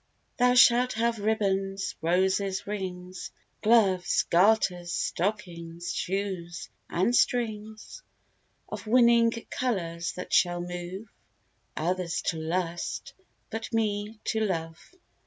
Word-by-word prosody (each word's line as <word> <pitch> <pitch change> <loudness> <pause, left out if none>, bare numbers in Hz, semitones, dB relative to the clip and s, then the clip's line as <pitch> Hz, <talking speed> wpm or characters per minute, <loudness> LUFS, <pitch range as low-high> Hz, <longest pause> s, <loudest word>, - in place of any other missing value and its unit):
Thou 250 -1 +4
shalt 250 0 +6
have 230 0 0
ribbands, 195 -2 0
roses, 190 +3 +1
rings, 185 -2 -5 0.3
Gloves, 200 -5 +3
garters, 180 -2 +3
stockings, 175 -4 -3
shoes, 175 -7 -3 0.2
and 195 +8 +1
strings 220 - -1 0.7
Of - - -7
winning 235 0 +5 0.2
colours, 170 - -2
that 180 - -7
shall 175 -1 +3
move 175 +4 -6 0.7
Others 175 +1 -1
to 165 - -2
lust, 170 +1 -3 0.4
but 225 0 -5
me 215 -1 -1
to 220 - -1
love. 165 -6 -2
195 Hz, 100 wpm, -28 LUFS, 175-220 Hz, 0.7 s, shalt